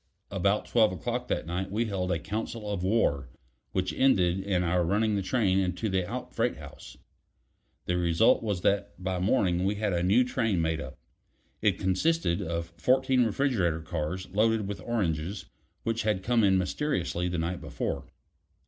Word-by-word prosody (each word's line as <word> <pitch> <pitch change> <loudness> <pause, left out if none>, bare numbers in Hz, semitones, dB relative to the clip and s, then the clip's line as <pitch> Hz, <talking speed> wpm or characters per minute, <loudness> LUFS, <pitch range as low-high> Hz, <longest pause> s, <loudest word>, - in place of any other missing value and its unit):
About 100 +2 +1
twelve 110 -3 +3
o'clock 90 -4 -3
that - - -1
night 90 +3 -3
we 110 +4 0
held 95 -4 -2
a 85 - +1
council 110 +3 -4
of 95 - -3
war, 70 - +1 0.4
which 95 0 -1
ended 95 -9 +3
in 95 -2 0
our 90 +1 +2
running 105 +5 +1
the 100 - 0
train 95 -2 +2
into 95 +3 -1
the 95 -2 -1
out - - -5
freight - - 0
house. - - -11 0.9
The 90 - 0
result 85 +5 +4
was 105 -5 -2
that 100 +1 0
by 95 0 -2
morning 90 -3 +2
we 100 +2 +1
had 105 -2 -1
a 85 - +1
new 100 +8 +4
train 115 -6 0
made 80 -1 0
up. 65 0 -8 0.6
It - - +2
consisted 95 - +1
of 85 0 -4
fourteen 130 -1 +3
refrigerator 105 - +1
cars 80 +4 -3
loaded 110 +1 +2
with 100 -2 -5
oranges 95 -4 -2 0.4
which 115 0 -1
had 105 -4 0
come 115 +1 +2
in 95 -2 +4
mysteriously 90 - -1
the 90 -1 -2
night 85 +2 -2
before. - - -4
95 Hz, 170 wpm, -28 LUFS, 90-110 Hz, 0.9 s, result